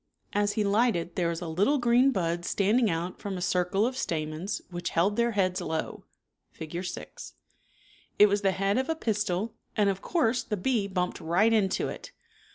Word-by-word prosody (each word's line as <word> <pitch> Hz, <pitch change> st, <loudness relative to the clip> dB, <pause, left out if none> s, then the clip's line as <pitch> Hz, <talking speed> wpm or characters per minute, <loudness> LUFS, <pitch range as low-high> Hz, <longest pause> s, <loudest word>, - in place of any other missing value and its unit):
As 205 Hz, 0 st, +1 dB
he 215 Hz, -, 0 dB
lighted 200 Hz, -4 st, +1 dB
there 175 Hz, -2 st, +1 dB
was 170 Hz, +1 st, -4 dB
a -, -, -4 dB
litUe 200 Hz, -, +1 dB
green 245 Hz, +2 st, +4 dB
bud 170 Hz, -7 st, -1 dB
standing 210 Hz, +6 st, +2 dB
out 170 Hz, +2 st, -3 dB
from 195 Hz, -2 st, -4 dB
a -, -, -4 dB
circle 180 Hz, +3 st, +1 dB
of 255 Hz, +2 st, -2 dB
stamens 160 Hz, -2 st, -3 dB
which 175 Hz, 0 st, -3 dB
held 195 Hz, +5 st, +1 dB
their 235 Hz, 0 st, +1 dB
heads 185 Hz, -3 st, +1 dB
low 160 Hz, 0 st, -4 dB, 0.4 s
(Fig, 165 Hz, +3 st, -6 dB
6). 180 Hz, -, -7 dB, 0.8 s
It 210 Hz, -, +8 dB
was 205 Hz, 0 st, +1 dB
the 195 Hz, -, +3 dB
head 195 Hz, +5 st, +1 dB
of 265 Hz, -, -2 dB
a 325 Hz, -, +1 dB
pistil, 210 Hz, -, -1 dB, 0.2 s
and 205 Hz, -2 st, +4 dB
of 195 Hz, 0 st, -6 dB
course 255 Hz, -8 st, +1 dB
the 215 Hz, -3 st, -3 dB
bee 220 Hz, 0 st, 0 dB
bumped 180 Hz, -2 st, -2 dB
right 180 Hz, +8 st, +3 dB
into 195 Hz, -4 st, +1 dB
it. -, -, -8 dB
200 Hz, 185 wpm, -28 LUFS, 175-225 Hz, 0.8 s, It